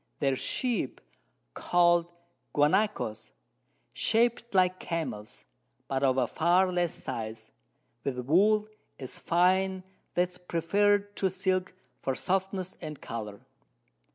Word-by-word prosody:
Their 135 -2 +1
Sheep 230 - -2 0.5
call'd 175 -1 +3 0.5
Guanacos, 145 - +1 0.6
shap'd 235 0 +1
like 185 0 +3
Camels, 155 - -5 0.4
but 135 -1 -1
of 130 -1 +3
a 130 - +3
far 175 +8 +2
less 175 -2 +1
Size, 110 -1 -6 0.5
with 135 -2 -2
Wool 200 - +3 0.3
so 135 - -6 0.2
fine 185 +2 +2 0.3
that 175 - +4
it 180 - -3
is 180 - -10
preferr'd 200 +4 +1
to 190 - +2
Silk 185 0 -1 0.3
for 135 - -1
Softness 190 +1 -2
and 155 -3 -6
Colour. 105 -3 -6
175 Hz, 115 wpm, -29 LUFS, 135-190 Hz, 0.6 s, that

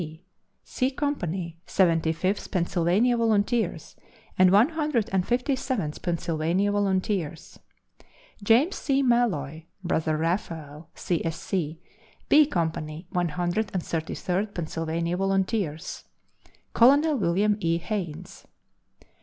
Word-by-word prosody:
C.), 160 +1 -9 0.4
C 255 - -1
Company, 185 - -3
Seventy 165 -3 +2
fifth 185 +5 -2
Pennsylvania 180 +6 +2
Volunteers 215 -6 0 0.4
and 185 0 +5
One 205 +9 +5
Hundred 300 -8 -1
and 185 -2 +1
Fifty 250 +3 +1
seventh 245 - -3
Pennsylvania 170 +3 0
Volunteers. 190 -5 -1 0.8
James 235 - +3
C. 275 -1 +1
Malloy 165 - 0 0.2
(Brother 160 -3 0
Raphael, 160 -2 -3
C. 175 -3 -2
S. 165 0 -3
C.), 165 -4 -3 0.5
B 300 -1 +6
Company, 160 - -3
One 175 -1 0
Hundred 175 +6 -1
and 180 - -1
Thirty 160 -1 -3
third 195 +3 -2
Pennsylvania 165 +1 -2
Volunteers. 195 -4 -1 0.7
Colonel 285 +6 +5
William 205 -1 +2
E. 165 -3 +1
Haynes. 170 -4 -6
180 Hz, 110 wpm, -26 LUFS, 165-220 Hz, 0.8 s, B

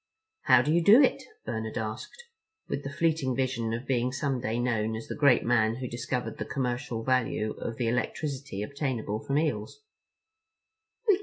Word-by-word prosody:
"How - - +6
do 150 - +1
you 170 0 +3
do 215 +8 +8
it?" 270 - +2 0.2
Bernard 110 -1 -4
asked, 110 - -5 0.4
with 140 - -3
a - - -4
fleeting 155 -4 0
vision 125 -3 -1
of 120 +3 -3
being 125 -1 +1
some 135 -1 -1
day 110 +1 -1
known 110 -3 0
as 115 - -7
the - - -4
great 140 -5 +4
man 115 -2 +2
who 130 +1 -4
discovered 125 +1 -3
the - - -1
commercial 125 -2 -3
value 115 -4 +1
of 115 - -4
the 120 - 0
electricity 125 -1 -2
obtainable 125 -5 -2
from 140 - 0
eels. 150 - -2
125 Hz, 165 wpm, -28 LUFS, 115-140 Hz, 0.4 s, do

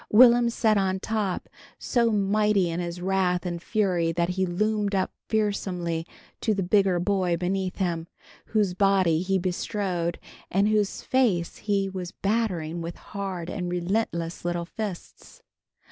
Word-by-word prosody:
Will'm 240 +1 +7
sat 220 -3 +2
on 190 -1 0
top, 210 -3 -2 0.3
so 235 -2 +1
mighty 205 -2 +2
in 165 - -2
his 175 0 -4
wrath 185 -1 +1
and 170 -1 -3
fury 180 -6 +1
that 170 +1 0
he 190 +1 0
loomed 205 +2 0
up 190 - 0 0.2
fearsomely 180 -6 -1 0.3
to 215 - +1
the 195 - 0
bigger 190 -1 +3
boy 180 -2 +1
beneath 185 +1 -1
him, 170 -4 -2 0.4
whose 210 -4 +1
body 185 -4 +3
he 190 +1 +1
bestrode 180 -1 -2 0.3
and 200 +3 +2
whose 210 -2 0
face 215 -10 +1
he 200 -2 0
was 185 -2 -5
battering 185 -6 -1
with 170 +1 -5
hard 190 -4 -5
and 180 -1 -3
relentless 175 -2 -1
little 175 0 -1
fists. 200 -1 -7
190 Hz, 145 wpm, -26 LUFS, 175-210 Hz, 0.4 s, Will'm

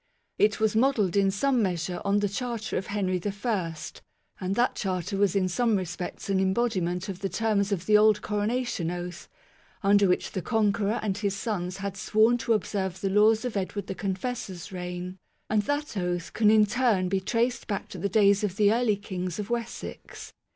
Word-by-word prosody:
It 210 0 +3
was 220 -1 +1
modelled 225 -6 +2
in 200 -1 +4
some 245 +6 +1
measure 180 -2 -2
on 200 +1 +2
the 205 - +2
Charter 230 +2 -4
of 185 - -2
Henry 185 -3 -1
I, 200 -5 -2 0.6
and 190 +1 -2
that 245 +2 +2
Charter 190 0 -2
was 200 -1 +2
in 190 -2 +2
some 230 +4 +1
respects 180 -1 -4
an 195 -1 +1
embodiment 190 -3 0
of 190 -2 -5
the 195 0 -2
terms 210 -2 0
of 185 -3 -1
the 210 0 +6
old 210 -1 +4
coronation 210 -3 -1
oath, 175 0 -6 0.5
under 200 0 +5
which 180 - 0
the 185 - -3
Conqueror 215 +2 +1
and 205 -1 -1
his 200 -2 -1
sons 195 -4 -3
had 195 0 -4
sworn 220 +4 +3
to 230 0 +1
observe 190 -3 -2
the 195 +1 -1
laws 215 +3 +4
of 245 - -3
Edward 200 +1 -3
the - - -4
Confessor's 195 -1 -4
reign; 180 0 -6 0.3
and 215 -1 +3
that 290 +4 -2
oath 180 -2 -2
can 215 -2 +4
in 215 -1 +6
turn 215 -4 +1
be 190 +1 +1
traced 235 +5 -1
back 200 -3 -3
to 185 - -8
the 200 +4 -1
days 200 0 +4
of 195 -3 -1
the 205 +1 +4
early 235 -3 +2
kings 185 -3 -5
of 210 +2 -5
Wessex. 235 -1 -6
200 Hz, 190 wpm, -27 LUFS, 185-220 Hz, 0.6 s, the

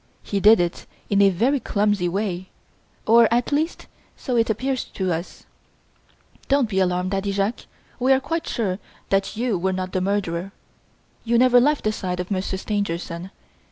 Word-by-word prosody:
He 200 - -2
did 215 +2 +7
it 175 -1 -2 0.2
in 200 0 +4
a 200 - +6
very 240 +10 +1
clumsy 205 -5 0
way 185 -1 -3 0.6
or, 230 0 +5
at 240 +3 +1
least, 310 +4 -1 0.3
so 255 - -3
it 230 -1 +2
appears 255 +4 -1
to 185 -3 -2
us. 170 +3 -6 1.0
Don't 275 -3 +3
be 195 -3 -1
alarmed, 180 0 0
Daddy 195 0 -1
Jacques; 200 +4 -2 0.3
we 255 +2 +2
are 265 - +5
quite 330 +4 -3
sure 195 -5 -2 0.3
that 195 +2 0
you 230 -5 0
were 190 +2 0
not 185 0 -3
the 185 - -1
murderer; 195 -1 -2 0.7
you 235 0 +2
never 250 0 +6
left 295 +3 +2
the 215 - +1
side 180 -4 -4
of 180 +2 -4
Monsieur 190 0 -1
Stangerson. 185 -3 -3
200 Hz, 170 wpm, -23 LUFS, 185-235 Hz, 1.0 s, did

